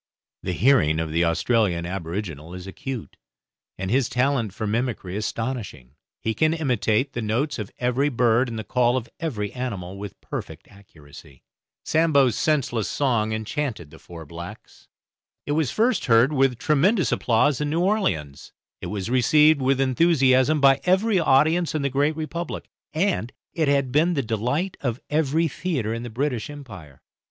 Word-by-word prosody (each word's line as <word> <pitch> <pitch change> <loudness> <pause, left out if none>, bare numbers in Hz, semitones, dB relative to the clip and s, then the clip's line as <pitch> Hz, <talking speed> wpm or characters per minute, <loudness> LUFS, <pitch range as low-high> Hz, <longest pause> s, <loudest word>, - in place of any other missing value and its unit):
The 90 - -3
hearing 90 - +3
of 80 -1 -3
the 85 +2 +2
Australian 85 0 +1
aboriginal 85 -2 -5
is 90 0 -8
acute, 120 +5 -7 0.6
and 95 +1 -4
his 130 0 +2
talent 125 -4 0
for 110 +3 -5
mimicry 110 -4 -2
astonishing; 105 - -4 0.3
he 110 - -2
can 155 +6 +2
imitate 125 -4 0
the 120 - -3
notes 120 +6 -1
of 105 -1 -5
every 125 +4 +1
bird 120 -1 +2
and 115 - -5
the 110 - -4
call 120 +3 +2
of 120 -2 -4
every 110 - -3
animal 100 -7 -5
with 100 -2 -8
perfect - - -7
accuracy. 75 -9 -16 0.4
Sambo's 140 -7 +3
senseless 130 -8 0
song 120 -6 0
enchanted 110 - -3
the - - -14
four 85 -2 -11
blacks. 85 +3 -11 0.6
It - - -3
was 150 -3 +1
first 235 +4 +1
heard 120 +4 +4
with 135 -3 +2
tremendous 170 - +2
applause 125 +5 +2
in 150 - -1
New 165 +3 0
Orleans, 180 - -1 0.3
it - - -5
was 105 +2 -4
received 150 +4 +4
with 135 +1 +2
enthusiasm 135 0 +3
by 135 -1 +5
every 190 +2 +2
audience 160 +3 +3
in 150 - -1
the 140 - +1
Great 145 +3 +1
Republic, 160 +2 -5 0.2
and 160 - 0 0.2
it 160 -3 0
had 140 -2 +1
been 165 +6 +2
the 140 - 0
delight 125 - -2
of 120 -2 -2
every 155 +2 +2
theatre 135 -8 -2
in 115 - -4
the 120 - -6
British 125 0 -2
Empire. 100 - -11
125 Hz, 160 wpm, -24 LUFS, 105-150 Hz, 0.6 s, by